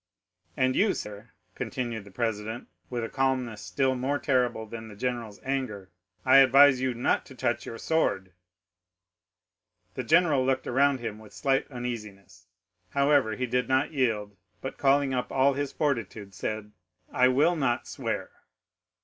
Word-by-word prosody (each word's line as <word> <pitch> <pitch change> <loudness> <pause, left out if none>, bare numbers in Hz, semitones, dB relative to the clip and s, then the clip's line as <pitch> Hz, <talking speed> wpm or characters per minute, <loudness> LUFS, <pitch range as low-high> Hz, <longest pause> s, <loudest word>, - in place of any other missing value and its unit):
"'"And 130 0 +2
you, 205 -1 +3
sir," 105 +2 -7 0.2
continued 115 -5 -4
the - - -12
president, 110 +2 -3 0.2
with 120 -2 -3
a - - -2
calmness 130 -5 -1
still 115 +7 0
more 130 +3 -1
terrible 125 -5 0
than 110 +1 -8
the 105 - -11
general's 115 -2 -4
anger, 120 -8 -3 0.3
"I 130 +1 +7
advise 135 0 +7
you 130 -2 0
not 120 - +1
to - - -12
touch - - -1
your 115 - -6
sword." 100 - 0 1.6
The - - -3
general 155 -1 +4
looked 130 0 0
around 135 0 +2
him 110 -2 -5
with 110 -2 -15
slight 135 -2 0
uneasiness; 105 -8 -7 0.4
however 140 -3 +2
he 125 - -2
did 125 +1 0
not 130 +3 +1
yield, 110 -7 0 0.2
but 135 - -7
calling 140 -1 +3
up 125 -1 -2
all 135 +1 +3
his 140 0 -3
fortitude, 115 -8 -2
said,—"I 105 +3 -2
will 145 +7 +3
not 130 -5 0
swear." - - -4
125 Hz, 150 wpm, -27 LUFS, 110-135 Hz, 1.6 s, I